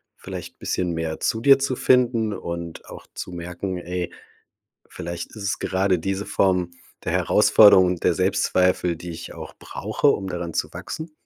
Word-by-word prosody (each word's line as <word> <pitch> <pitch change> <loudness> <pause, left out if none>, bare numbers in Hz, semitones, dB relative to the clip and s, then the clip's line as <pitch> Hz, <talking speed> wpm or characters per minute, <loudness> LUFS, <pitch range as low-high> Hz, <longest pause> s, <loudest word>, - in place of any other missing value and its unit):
vielleicht - - -9
bisschen 90 -1 -1
mehr 80 -1 -3
zu 110 - 0
dir 135 +2 +6
zu 135 -1 -1
finden 120 -4 +2
und 85 -3 -6
auch - - -11
zu - - -6
merken: 90 +2 -5
„Ey, 90 0 -4 0.8
vielleicht 85 0 -6
ist 105 - -8
es 100 +1 -1
gerade 95 -1 +1
diese 95 +4 -3
Form 90 -2 +1 0.3
der - - -1
Herausforderung 100 -4 +6
und 90 -1 -2
der 90 - +4
Selbstzweifel, 90 -1 +1
die 85 +2 -8
ich 85 0 -8
auch - - -9
brauche, - - -2
um 95 - +2
daran 85 -2 -5
zu - - -2
wachsen?“ 160 0 -7
90 Hz, 165 wpm, -23 LUFS, 85-100 Hz, 0.8 s, dir